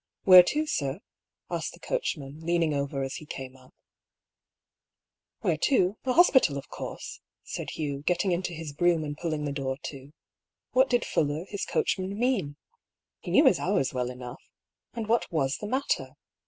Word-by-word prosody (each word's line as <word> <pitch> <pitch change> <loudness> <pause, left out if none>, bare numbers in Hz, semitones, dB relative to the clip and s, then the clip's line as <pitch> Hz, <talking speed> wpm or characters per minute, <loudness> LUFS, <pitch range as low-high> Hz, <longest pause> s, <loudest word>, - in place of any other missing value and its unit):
" - - -64
Where 185 -1 +10
to, 300 +12 0
sir? 140 - -2 0.3
" - - -34
asked - - -3
the - - -14
coachman, 150 - -3
leaning 165 -1 +1
over 140 -1 -2
as 135 - -4
he 155 - -10
came 130 -3 -7
up. 130 -1 -19 0.9
" - - -64
Where - - +1
to? 200 -8 +3
The 255 - +1
hospital, 260 - +5
of 140 - -8
course," - - -7 0.2
said - - -5
Hugh, 145 -3 -4
getting 180 +4 +1
into 175 0 -1
his 160 -3 -6
brougham 170 +1 +2
and 145 -1 -4
pulling 155 -2 -3
the 145 - -2
door 135 -2 -3
to. 140 -1 -9 0.6
What 260 +1 +4
did 245 -1 +2
Fuller, 150 +2 0
his 200 -1 -3
coachman, 190 +1 -1
mean? 220 - 0 0.6
He - - -8
knew - - +5
his - - +5
hours 135 0 0
well 125 -1 -1
enough. 125 0 -8 0.5
And 230 -2 -3
what 225 -1 +1
was 140 -4 0
the 210 - -6
matter? 265 +5 -1
155 Hz, 180 wpm, -28 LUFS, 140-195 Hz, 0.9 s, Where